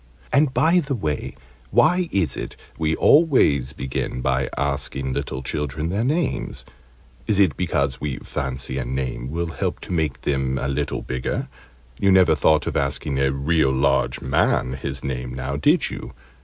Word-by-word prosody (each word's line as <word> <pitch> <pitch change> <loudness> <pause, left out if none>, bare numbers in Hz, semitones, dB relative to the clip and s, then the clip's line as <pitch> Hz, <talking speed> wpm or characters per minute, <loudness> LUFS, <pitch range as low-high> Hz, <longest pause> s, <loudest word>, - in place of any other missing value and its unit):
And, 145 0 +4
by 165 +6 +4
the 140 -4 -2
way, 75 - -3 0.3
why 175 - +3
is 95 -5 +1
it - - -6 0.2
we 80 -1 0
always 125 - +4
begin 65 -2 -3
by 65 +1 0
asking 70 -1 -1
little 65 - -3
children 75 +3 -2
their 100 +5 0
names? 150 +3 -1 0.6
Is 105 - +2
it 95 -8 +4
because 70 -7 -1
we 70 -3 -2
fancy 65 0 -4
a - - -1
name 65 0 -3
will 85 +3 -2
help 75 - -2
to - - -5
make 80 -5 -1
them 65 -2 0
a 65 - -2
little 70 - -2
bigger? 65 0 -3 0.5
You 100 - +4
never 95 -1 +6
thought 80 -2 +3
of - - -3
asking 70 0 -1
a 70 0 +2
real 70 +2 +2
large 70 +1 +1
man 65 - +1
his 65 +1 -5
name, 65 -2 -4
now, 65 +2 -3
did 70 - +2
you? - - -8
70 Hz, 165 wpm, -23 LUFS, 65-85 Hz, 0.6 s, never